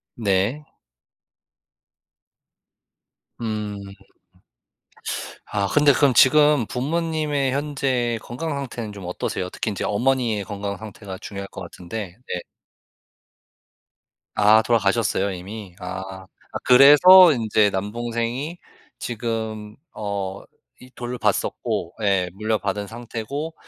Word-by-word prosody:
네. 105 +6 0 2.8
음. 105 -2 -3
음. 100 0 -10 1.5
아 100 -2 -1
근데 145 +2 +4
그럼 140 -3 +3
지금 145 +1 +5
부모님의 150 0 -1
현재 135 -5 -1
건강 160 +7 -5
상태는 125 -6 -5
좀 100 -3 -9
어떠세요? 90 +1 -3
특히 110 - -3
인제 100 - -4
어머니의 120 -1 +1
건강 100 0 -5
상태가 100 -2 -9
중요할 100 0 -7
것 - - -9
같은데 90 +1 -7
네. 90 - -3 2.0
아 105 +2 +6
돌아가셨어요 105 -3 +1
이미? 95 +1 -8
아. 95 +1 -7 0.3
아 - - -3
그래서 150 +8 +9
인제 110 -4 +2
남동생이 120 - -3 0.4
지금 110 -2 -4 0.2
어 100 -2 -4 0.4
이 125 - -13
돌봤었고 120 -7 -2
예. 95 -3 +2
물려받은 105 -1 -2
상태고 120 +7 -5
110 Hz, 210 characters per minute, -23 LUFS, 100-130 Hz, 2.8 s, 그래서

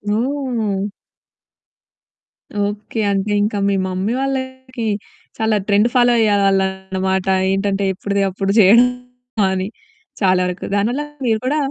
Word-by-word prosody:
ఓహ్! 235 -6 -1 1.8
Okay. 205 +2 -5
అంటే 200 +1 -1
ఇంకా 210 0 -1
మీ 200 - +1
mummy 190 +4 -2
వాళ్ళకి 260 -2 -4 0.5
చాలా 220 -1 +1
ట్రెండ్ 205 +2 +4
ఫాలో 245 -1 +4
అయ్యేవాళ్ళనమాట. 190 -2 +1 0.3
ఏంటంటే, 195 0 0
ఎప్పుడుది 200 +1 -2
అప్పుడు 195 +1 -2
చేయడం 225 +5 +7 0.6
అని. 190 0 -1 0.5
చాలా 185 -2 +4
వరకు 180 0 -4
దాని 205 +2 +2
వల్ల 290 +4 -2 0.2
మీరు 220 -2 +2
కూడా 285 +4 +1
205 Hz, 115 wpm, -19 LUFS, 195-235 Hz, 1.8 s, చేయడం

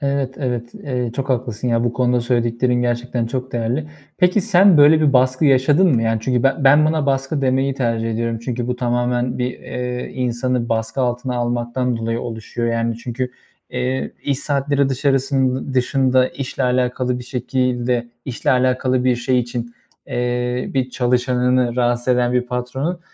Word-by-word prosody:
Evet, 140 -2 -1
evet. 120 -3 -3
Eee, 125 -4 -3
çok 135 0 -3
haklısın 125 -2 -2
ya, 115 0 +1
bu 120 - 0
konuda 125 0 +1
söylediklerin 120 +1 0
gerçekten 120 0 -1
çok 130 +2 -4
değerli. 120 +6 -2 0.3
Peki, 180 +3 +3
sen 190 0 +5
böyle 150 +2 +7
bir 150 -2 +3
baskı 130 +3 +3
yaşadın 145 +6 +4
mı? 115 - +1
Yani 115 0 +1
çünkü 125 0 0
ben 135 +2 +1
ben 145 +3 +6
buna 155 -2 0
baskı 135 +2 0
demeyi 135 +1 +1
tercih 115 -3 -1
ediyorum 115 0 -2
çünkü 120 -1 -3
bu 125 - -2
tamamen 120 0 -1
bir, 125 0 0
eee, 125 0 -5
insanı 125 -1 -1
baskı 115 +3 -1
altına 125 0 -1
almaktan 120 +1 -1
dolayı 115 +1 -2
oluşuyor. 115 0 -4
Yani 115 0 -1
çünkü 125 +2 -4 0.4
eee, 125 +1 -2
iş 140 -2 0
saatleri 140 -1 0
dışarısın 135 -1 0
dışında 130 0 +2
işle 135 0 -5
alakalı 125 0 0
bir 125 - -8
şekilde 125 -1 -1 0.2
işle 125 -3 -2
alakalı 130 0 +1
bir 125 -1 +3
şey 125 +1 +1
için 120 0 -5 0.3
eee, 125 0 -2
bir 130 -1 0
çalışanını 125 0 +1
rahatsız 120 0 0
eden 125 -1 +2
bir 125 0 +2
patronun 130 +8 -3
125 Hz, 160 wpm, -20 LUFS, 120-130 Hz, 0.4 s, böyle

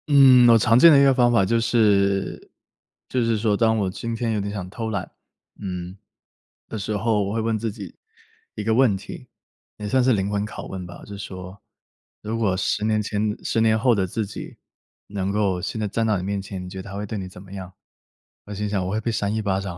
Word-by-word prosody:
嗯， 130 -4 +7
我 115 - +7
常 115 +2 +4
见 165 +4 +9
的 140 - +7
一 - - +6
个 135 -1 +5
方 120 -2 +3
法 100 -5 +3
就 115 +4 +2
是 100 -4 +1 0.6
就 125 -2 0
是 115 -1 +1
说 105 -1 +1
当 110 +1 +2
我 100 -3 0
今 115 +5 -4
天 115 0 -1
有 105 - -1
点 100 +1 -4
想 100 -3 -5
偷 110 +3 -4
懒， 100 -4 -4 0.5
嗯， 90 -2 -5 0.7
的 110 - -6
时 105 +1 -2
候， 105 0 +1
我 100 - -3
会 115 - -1
问 110 0 0
自 115 0 -2
己 100 -4 -10 0.6
一 105 - -4
个 110 +1 +1
问 115 -5 +4
题， - - -10 0.5
也 105 - -5
算 130 +4 +2
是 130 0 +4
灵 100 -2 0
魂 105 0 -1
拷 110 - -8
问 95 -1 -6
吧。 85 - -11
就 100 - -9
是 - - -12
说 95 0 -8 0.6
如 110 +2 -3
果 100 -5 +1
10 95 - -1
年 110 -1 +1
前 105 0 -2
10 115 - 0
年 110 -1 +4
后 120 +2 +3
的 95 -2 0
自 110 +4 -2
己 100 - -9 0.5
能 100 -1 -3
够 100 -3 0
现 110 - -4
在 105 - -1
站 115 +3 -1
到 105 -2 +2
你 90 - -4
面 100 +1 -2
前， 95 -1 -7
你 - - -8
觉 95 +1 -7
得 95 - -11
他 95 - -7
会 105 - -3
对 105 +1 -5
你 95 -2 -5
怎 90 - -12
么 95 - -15
样？ 95 -2 -7 0.7
我 105 - -8
心 105 +1 -3
想 100 -2 -1
我 - - -3
会 110 - 0
被 115 - -1
扇 105 -2 -1
一 - - 0
巴 100 -2 0
掌， 95 -3 -6
105 Hz, 260 characters per minute, -23 LUFS, 95-115 Hz, 0.7 s, 见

